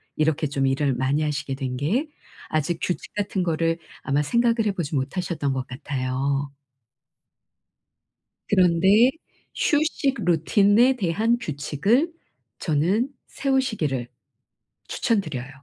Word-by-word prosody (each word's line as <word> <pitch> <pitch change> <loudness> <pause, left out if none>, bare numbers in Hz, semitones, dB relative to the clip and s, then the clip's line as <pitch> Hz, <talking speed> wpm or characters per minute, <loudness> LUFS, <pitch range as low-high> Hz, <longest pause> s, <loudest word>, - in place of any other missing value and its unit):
이렇게 155 0 +1
좀 135 -1 0
일을 135 0 +1
많이 135 +5 0
하시게 145 -2 -2
된 130 -2 -4
게 210 - 0 0.4
아직 155 +2 -1
규칙 180 - -3
같은 200 -2 -1
거를 165 0 0 0.3
아마 140 +2 +1
생각을 230 - +2
해 - - +2
보지 165 -5 -3
못하셨던 145 0 -2
것 130 -1 -3
같아요. 135 +1 -2 2.0
그런데 190 +6 +5 0.4
휴식 295 -3 +1
루틴에 205 +9 +4
대한 220 +4 +1
규칙을 195 - 0 0.5
저는 185 - +1 0.2
세우시기를 215 - -1 0.8
추천 225 -4 +1
드려요. 130 -6 -6
165 Hz, 240 characters per minute, -24 LUFS, 140-215 Hz, 2.0 s, 그런데